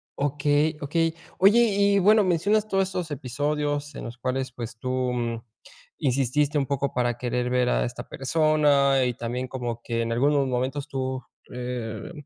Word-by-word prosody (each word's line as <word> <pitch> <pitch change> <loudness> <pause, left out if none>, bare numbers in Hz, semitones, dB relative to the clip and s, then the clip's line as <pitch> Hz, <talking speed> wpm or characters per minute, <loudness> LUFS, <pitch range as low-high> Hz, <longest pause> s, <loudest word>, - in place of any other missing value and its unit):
Okey, 145 +2 +1
okey. 165 +3 0 0.3
Oye, 200 +5 +6 0.2
y 200 0 +4
bueno, 210 +3 +5
mencionas 200 +4 +2
todos 195 -2 +1
esos 180 -4 -4
episodios 145 +2 -2
en - - -6
los 120 +1 -8
cuales 130 +1 -2
pues 120 -1 -7
tú, 130 - -4 0.2
mm, 115 -2 -3 0.6
insististe 140 +1 +1
un 140 - +1
poco 140 0 -2
para 120 -1 0
querer 125 0 -1
ver 125 -1 +2
a - - +1
esta 120 +1 -6
persona, 140 -2 +3
y 125 - 0
también 120 +2 -4
como 120 -3 -4
que 115 -1 -2
en 115 0 -2
algunos 140 +3 +2
momentos 130 +3 -2
tú, 130 -2 -3 0.3
eh 125 -3 -5
135 Hz, 160 wpm, -25 LUFS, 125-150 Hz, 0.6 s, Oye